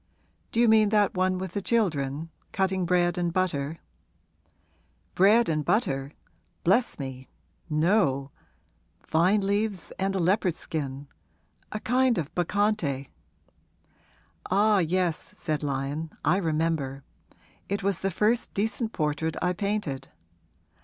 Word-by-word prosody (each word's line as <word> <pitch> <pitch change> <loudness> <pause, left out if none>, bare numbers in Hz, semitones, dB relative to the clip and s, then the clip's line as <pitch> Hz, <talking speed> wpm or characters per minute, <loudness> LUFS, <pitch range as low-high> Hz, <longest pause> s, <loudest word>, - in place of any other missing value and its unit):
'Do 225 - -1
you 240 - +5
mean 220 -1 +5
that 210 -2 +3
one 185 0 +1
with 185 -1 -4
the 200 - -3
children 165 - 0 0.2
cutting 190 -2 0
bread 175 0 +2
and 175 -1 0
butter?' 165 -4 -1 1.4
'Bread 215 +5 +5
and 155 -2 0
butter? 140 - 0 0.5
Bless 215 +8 +2
me, 130 -2 -7 0.4
no 150 -4 +2 0.8
vine 185 +6 +4
leaves 200 0 -1
and 195 0 0
a - - +1
leopard 185 0 +2
skin 140 -5 -5 0.6
a 215 - -3
kind 250 +2 +2
of 155 -3 -3
Bacchante.' 175 -7 0 1.4
'Ah, 205 +2 +4
yes,' 175 +1 -1
said 155 -3 -2
Lyon; 145 +2 -2 0.2
'I 170 +6 +4
remember. 155 -6 -1 0.7
It 200 0 -2
was 195 -2 0
the 195 - 0
first 215 +6 +1
decent 220 +2 -1
portrait 155 0 -1
I 180 +1 +1
painted. 200 -8 -2
180 Hz, 120 wpm, -27 LUFS, 150-205 Hz, 1.4 s, you